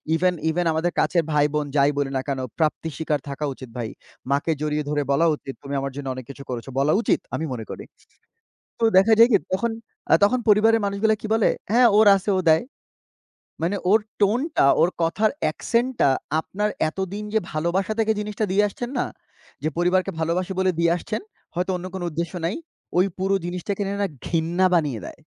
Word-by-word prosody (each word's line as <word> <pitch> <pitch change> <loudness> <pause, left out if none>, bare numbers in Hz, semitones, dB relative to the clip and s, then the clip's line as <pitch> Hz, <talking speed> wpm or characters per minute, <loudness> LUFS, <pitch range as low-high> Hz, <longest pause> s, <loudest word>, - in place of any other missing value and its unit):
Even 180 +2 +2 0.2
even, 175 +2 0
আমাদের 165 +2 0
কাছের 170 -2 +2
ভাইবোন 150 0 +1
যাই 140 0 +4
বলি 140 -1 0
না - - 0
কেনো 135 -2 -2 0.2
প্রাপ্তি 160 +1 0
স্বীকার 155 -2 -1
থাকা 150 +2 -3
উচিত 130 -1 -11
ভাই। 115 -2 -3 0.4
মাকে 145 +4 +1
জড়িয়ে 150 0 -1
ধরে 150 -1 0
বলা 160 +4 +3
উচিত, 135 -2 -8
"তুমি 140 0 -6
আমার 135 0 -3
জন্য 145 -1 -6
অনেক 130 - -8
কিছু 140 0 -9
করেছ।" 125 0 -5
বলা 145 +3 +3
উচিত - - +2 0.2
আমি 160 - -2
মনে 110 -3 -6
করি। - - -7 1.0
তো - - -2
দেখা 205 +4 +6
যায় 230 +2 +7
কি 205 - +6 0.2
তখন, 235 +5 0 0.4
আ - - +7
তখন 250 +5 +4
পরিবারের 220 +2 +5
মানুষগুলা 200 +2 +1
কি - - -4
বলে? 225 -2 +3 0.2
হ্যাঁ, 240 +2 +6
ওর 215 0 +6
আছে 195 +2 -3
ও - - +2
দেয়। 160 0 +5 1.0
মানে 190 +5 0
ওর 220 - +6 0.2
টোনটা, 235 - +2
ওর 175 - +4
কথার 200 +6 +2 0.2
একসেন্টটা 240 - +1 0.3
আপনার 210 +5 -2 0.2
এতদিন 190 +5 -4
যে - - +5
ভালোবাসা 170 +6 0
থেকে 220 0 +2
জিনিসটা 210 +1 -2
দিয়ে 205 +2 +4
আসছেন 240 +5 -6
না, - - 0 0.6
যে 155 - +1
পরিবারকে 180 +2 +2
ভালোবাসে 175 +4 -1
বলে 185 0 +3
দিয়ে 170 0 +3
আসছেন, 215 +5 -4 0.3
হয়তো 180 +2 -1
অন্য 180 +1 -6
কোনো 185 -2 -4
উদ্দেশ্য 170 +3 -4
নাই, 185 - -2 0.4
ওই 185 - +5
পুরো 195 +1 +1
জিনিসটা 180 +3 -3
কিনে 200 -1 -1
না 200 - -3
নিয়ে 205 - 0
না 200 - +1 0.2
ঘৃণা 170 +3 +1
বানিয়ে 145 -9 +1
দেয়। - - -11
175 Hz, 195 wpm, -23 LUFS, 150-205 Hz, 1.0 s, যায়